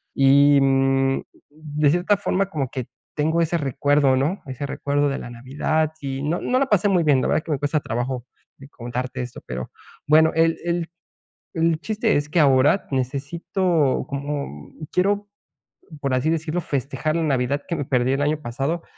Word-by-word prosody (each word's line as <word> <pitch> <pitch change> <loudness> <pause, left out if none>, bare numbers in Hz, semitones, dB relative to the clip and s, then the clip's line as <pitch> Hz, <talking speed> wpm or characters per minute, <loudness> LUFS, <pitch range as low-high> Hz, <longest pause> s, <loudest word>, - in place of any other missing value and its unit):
y, 140 +1 +6
mm, 135 0 +2 0.3
de 150 -1 -1
cierta 180 +5 +2
forma 195 0 0
como 140 -8 -2
que 130 -3 -5 0.3
tengo 160 +3 +1
ese 170 +1 +1
recuerdo, 145 -1 +2
¿no?, 150 +9 0
ese 135 +1 -5
recuerdo 145 +1 0
de 135 - -2
la - - -8
Navidad 145 +6 -1
y 135 -1 -4
no 160 +4 0
no 255 - +1
la 275 - +1
pasé 205 -4 +3
muy 180 -3 +3
bien, 140 -4 +3
la - - 0
verdad - - +2
es - - -12
que 165 - -4
me 140 - -2
cuesta 145 +2 0
trabajo 125 -1 -3 0.3
de 135 +1 -14
contarte 125 0 -5
esto, 125 0 -7
pero 65 0 -5 0.4
bueno, 160 +2 +5
el 165 0 +3
el 170 -1 -1 0.6
el 165 -1 +1
chiste 220 +2 0
es 145 +1 -2
que 170 - +1
ahora 145 +4 +4
necesito 145 +4 0
como 140 - -5 0.2
quiero, 205 +2 +1 0.7
por 135 -2 -1
así 130 +5 +1
decirlo, 165 +1 -1
festejar 145 +2 -2
la 165 - 0
Navidad 140 -1 0
que 170 - -2
me 145 - -3
perdí 130 0 +1
el 135 - 0
año 150 +1 0
pasado 140 +7 -3
145 Hz, 180 wpm, -22 LUFS, 135-165 Hz, 0.7 s, y